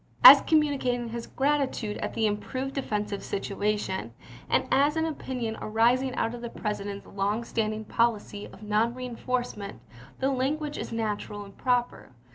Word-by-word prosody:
As - - +12
communicating 270 -6 +1
his 235 0 -5
gratitude 270 -6 0
at - - -4
the 225 - +2
improved 255 +6 -2
defensive 210 -6 -2
situation, 200 - -2 0.3
and - - +3
as 290 +3 +3
an 320 - +2
opinion 255 -7 -3
arising 245 +4 +2
out 225 - 0
of 240 - -7
the 235 - -5
President's 205 -2 -4
long 205 +3 -1
standing 215 -1 -2
policy 210 -2 0
of 210 - -14
non 215 +3 +1
reenf 250 -2 -7
orcement, 245 -5 -2 0.4
the 270 +1 +1
language 290 +3 -1
is - - -5
natural 210 -2 -3
and 200 - -14
proper. 245 - -1
230 Hz, 150 wpm, -28 LUFS, 210-260 Hz, 0.4 s, As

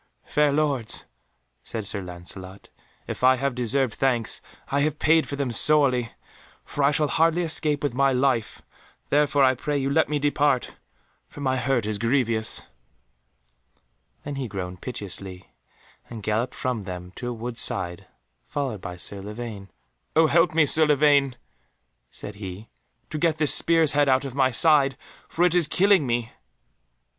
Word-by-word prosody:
"Fair 150 -1 +2
Lords," 140 -6 0 0.6
said 110 -3 -5
Sir 100 0 -2
Lancelot, 90 +2 -9 0.3
"if - - -7
I 130 0 +6
have 135 +1 -2
deserved 125 0 0
thanks, 120 -3 0 0.3
I 140 - +1
have 150 0 0
paid 160 +1 +3
for 140 - -4
them 140 -3 -2
sorely, 130 -2 +3 0.5
for 145 - -3
I 140 - +5
shall 150 0 +1
hardly 165 +4 +2
escape 155 -3 +1
with 145 - -1
my 135 +2 +2
life, 125 -4 0 0.5
therefore 145 -1 +3
I 130 -1 +5
pray 145 +3 -3
you 135 0 -1
let 160 +1 +2
me 150 - 0
depart, 145 -2 0 0.5
for 145 - -12
my 130 -2 0
hurt 125 -2 0
is 105 -1 -3
grievous." 115 -2 0 1.6
Then 145 -1 -6
he 135 -2 -3
groaned 90 -3 -6
piteously, 95 -5 -7 0.6
and 115 -3 -8
galloped 110 +5 -1
from 125 -4 -2
them 90 -2 -8
to 120 - -5
a - - -3
wood's 120 +1 -4
side, 85 -1 -1 0.4
followed 130 -9 -4
by 90 -2 -7
Sir 100 +3 -5
Lavaine. 105 -1 -8 0.5
"Oh 160 +1 +5
help 165 +1 +2
me, 160 -2 +5
Sir 155 +2 +4
Lavaine," 145 -3 +3 0.7
said 105 - -9
he, 95 +3 -8 0.4
"to 155 - -3
get 160 -1 +1
this 150 -2 +3
spear's 165 -3 +4
head 145 -1 +2
out 130 +1 +2
of 135 - -6
my 135 -1 +2
side, 140 +1 +3 0.3
for 175 - +1
it 180 - +2
is 175 -4 +3
killing 190 -6 +3
me." 120 -1 -2
130 Hz, 160 wpm, -24 LUFS, 110-145 Hz, 1.6 s, I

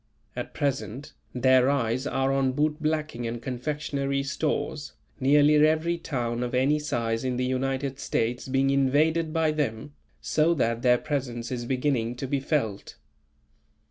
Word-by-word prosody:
At - - -6
present, 140 -1 -3 0.2
their 130 +1 +4
eyes 130 -1 0
are 135 0 0
on 135 -1 +1
bootblacking 150 -3 -1
and 115 +1 -4
confectionery 140 +2 -2
stores, 150 +1 -2 0.3
nearly 145 +2 +5
every 160 +3 +3
town 120 -6 -2
of 125 0 -2
any 140 +4 +3
size 115 -5 -2
in 130 -1 -1
the 125 - 0
United 135 +1 -2
States 120 +1 -1
being 135 +1 +2
invaded 155 +4 +2
by 160 -1 +2
them, 145 -3 -3 0.3
so 160 +2 +2
that 115 -4 0
their 125 -1 +4
presence 125 -5 -3
is 120 -2 -3
beginning 125 -3 0
to 130 - -5
be 140 +1 -1
felt. 130 -8 -2
135 Hz, 140 wpm, -26 LUFS, 125-150 Hz, 0.3 s, nearly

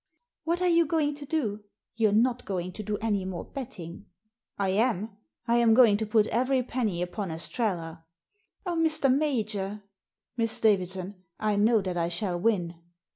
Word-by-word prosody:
"What 340 +2 0
are - - +3
you 335 -2 +4
going 300 -2 +1
to 285 0 -9
do? 220 -10 -2 0.3
You're 225 -2 +2
not 240 +3 +2
going 185 -2 -3
to 215 - -7
do 210 0 -2
any 210 -4 0
more 185 -2 -5
betting?" 215 - -8 0.3
" 235 - -60
I 195 -1 0
am. 215 0 0 0.3
I 235 +1 +3
am 230 -2 +5
going 235 -4 +7
to 220 0 -3
put 215 0 +3
every 255 +3 +1
penny 220 -8 -1
upon 185 +2 -4
Estrella." 165 -1 -3 0.6
"Oh, 355 - -1
Mr. 310 -5 +2
Major! 215 -8 -1 0.3
" 240 - -55
Miss 225 -1 +1
Davidson, 190 -2 0 0.2
I 210 -1 +1
know 215 +2 +4
that 185 -2 -3
I 170 0 0
shall 175 0 -2
win." 175 -5 0
215 Hz, 175 wpm, -28 LUFS, 190-250 Hz, 0.6 s, going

